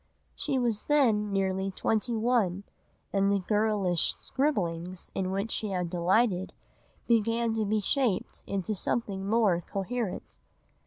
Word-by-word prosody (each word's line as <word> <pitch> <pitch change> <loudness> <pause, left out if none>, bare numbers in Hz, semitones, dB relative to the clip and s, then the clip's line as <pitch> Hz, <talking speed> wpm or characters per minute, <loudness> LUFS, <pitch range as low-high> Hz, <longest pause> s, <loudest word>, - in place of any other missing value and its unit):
She 280 -3 -1
was 235 -4 0
then 225 -9 +3
nearly 190 0 0
twenty 220 +4 0
one, 220 -5 +1 0.5
and 195 0 +3
the 200 -1 +1
girlish 205 -5 +2
scribblings 185 - -2
in 185 -1 -1
which 195 +4 -2
she 215 - -1
had 180 -3 -2
delighted 185 +2 +2 0.5
began 230 0 +2
to 220 -1 0
be 215 +1 +1
shaped 230 -1 0
into 200 +2 -2
something 195 -1 -2
more 210 -6 +3
coherent. 200 +3 -4
205 Hz, 125 wpm, -29 LUFS, 190-230 Hz, 0.5 s, then